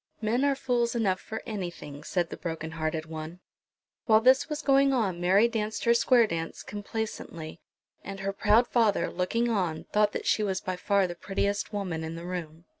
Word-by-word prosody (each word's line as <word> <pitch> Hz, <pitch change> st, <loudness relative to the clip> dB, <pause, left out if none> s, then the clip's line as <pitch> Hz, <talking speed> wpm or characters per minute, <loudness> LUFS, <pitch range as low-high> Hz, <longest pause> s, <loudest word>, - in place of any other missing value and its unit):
"Men 230 Hz, +4 st, +1 dB
are 285 Hz, -1 st, +3 dB
fools 245 Hz, -3 st, 0 dB
enough 195 Hz, -5 st, +1 dB
for 220 Hz, -, -6 dB
anything," 175 Hz, -8 st, -6 dB
said 175 Hz, -3 st, -1 dB
the -, -, -4 dB
broken 160 Hz, -2 st, -5 dB
hearted 155 Hz, 0 st, -2 dB
one. 160 Hz, +2 st, -7 dB, 0.7 s
While 220 Hz, -2 st, +6 dB
this 260 Hz, +5 st, +4 dB
was 300 Hz, 0 st, -3 dB
going 275 Hz, 0 st, +4 dB
on 195 Hz, -9 st, 0 dB
Mary 195 Hz, +6 st, +5 dB
danced 220 Hz, -2 st, -3 dB
her 235 Hz, -, +5 dB
square 235 Hz, 0 st, +5 dB
dance 165 Hz, -5 st, -4 dB
complaisantly; 205 Hz, -6 st, -6 dB, 0.4 s
and 195 Hz, 0 st, -7 dB
her 195 Hz, 0 st, -2 dB
proud 215 Hz, +4 st, +4 dB
father, 225 Hz, -4 st, +2 dB
looking 230 Hz, +7 st, 0 dB
on, 180 Hz, -8 st, -1 dB
thought 210 Hz, 0 st, +4 dB
that -, -, -4 dB
she -, -, +2 dB
was 190 Hz, -3 st, 0 dB
by 185 Hz, -, -3 dB
far 200 Hz, +1 st, +2 dB
the 175 Hz, -, -4 dB
prettiest 200 Hz, +3 st, -2 dB
woman 185 Hz, -6 st, -3 dB
in 160 Hz, +1 st, -5 dB
the 170 Hz, +1 st, -7 dB
room. 170 Hz, -2 st, -6 dB
200 Hz, 190 wpm, -28 LUFS, 170-230 Hz, 0.7 s, While